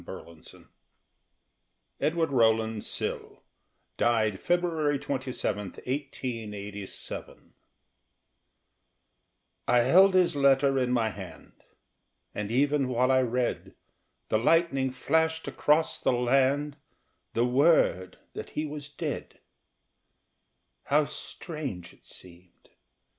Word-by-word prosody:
THE 85 - -8
LETTER 85 -3 -13 1.3
EDWARD 160 -1 0
ROWLAND 110 -3 +2
SILL, - - -5 0.5
DIED 110 -4 +1
FEBRUARY 165 -5 +1
27, 130 -7 -3
1887 110 -7 -6 2.1
I 125 - +4
held 185 +10 +5
his 180 -4 +3
letter 135 -1 +3
in 125 -1 0
my 115 -3 +2
hand, 95 -3 -11 0.7
And 105 -1 -4
even 140 +3 +2
while 125 +1 +2
I 130 0 +4
read 125 0 -2 0.5
The 110 - +2
lightning 135 0 +2
flashed 160 +5 0
across 155 +2 +1
the - - +1
land 135 +4 +1 0.6
The 120 - +3
word 125 - +3 0.2
that - - -7
he 155 - 0
was 145 -1 -7
dead. 145 - -5 1.5
How 150 +1 +3
strange 140 - -7
it - - -23
seemed! 90 0 -14
130 Hz, 95 wpm, -28 LUFS, 110-150 Hz, 2.1 s, held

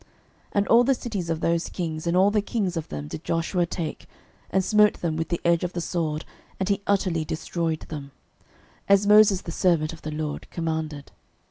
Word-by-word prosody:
06:011:012 - - -28 0.4
And 200 -1 +2
all 235 +1 +7
the 270 +2 +3
cities 205 -9 -4
of 165 -1 -1
those 170 0 0
kings, 160 -2 -4
and 170 +1 +2
all 195 +2 +5
the 210 0 +2
kings 200 -4 -2
of 165 -2 -3
them, 75 0 -6
did 150 - -7
Joshua 170 +1 0
take, 165 -2 -5 0.4
and 190 -1 +1
smote 210 0 +5
them 165 -2 -2
with 160 0 -2
the 170 - -1
edge 170 0 +3
of 180 - -2
the 175 - -2
sword, 165 -3 -2 0.3
and 190 +1 -1
he 200 0 +1
utterly 185 -5 +1
destroyed 160 0 -2
them, 145 -3 -7 0.8
as 200 0 +5
Moses 210 -2 +6
the 170 - -7
servant 165 -3 +1
of 165 - -12
the 155 - -5
LORD 150 -1 -4
commanded. 160 -3 -4
170 Hz, 205 wpm, -25 LUFS, 160-195 Hz, 0.8 s, all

